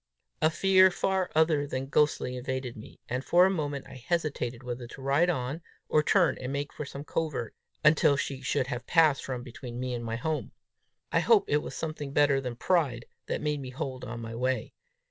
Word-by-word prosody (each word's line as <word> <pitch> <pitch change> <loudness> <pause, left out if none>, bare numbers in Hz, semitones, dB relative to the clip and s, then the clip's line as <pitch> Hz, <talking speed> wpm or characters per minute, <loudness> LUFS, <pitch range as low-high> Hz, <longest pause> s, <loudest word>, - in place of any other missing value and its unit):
A 155 - +5
fear 190 +3 +5
far 190 0 0
other 155 -2 +3
than 130 -1 -3
ghostly 140 -3 +1
invaded 130 -1 -4
me, 110 - -12
and 125 +2 -2
for 175 +4 +5
a 190 - +3
moment 145 -6 -3
I 130 -2 -11
hesitated 135 -7 -2
whether 120 0 -5
to 120 - -11
ride 140 +6 +2
on, 140 0 -2 0.3
or 155 - +4
turn 165 -2 +3
and 130 +1 -4
make 140 0 -3
for 150 - -5
some 140 +1 -7
covert, 150 -6 -3 0.3
until 150 -1 +5
she 135 -2 -3
should 130 - 0
have 125 -1 -5
passed 155 -4 +4
from 125 -2 -4
between 120 -1 -8
me 125 0 -2
and 120 -1 -4
my 115 0 -3
home. 155 +6 -3 0.6
I - - +3
hope 445 -4 +5
it 150 - +3
was - - -7
something 150 -3 -4
better 145 -2 +4
than 125 -2 -4
pride 130 -5 +1 0.2
that - - -2
made 150 -1 -1
me 130 - -6
hold 130 0 -5
on 120 +1 -6
my 115 0 -6
way. 130 +2 -1
140 Hz, 205 wpm, -29 LUFS, 125-155 Hz, 0.6 s, A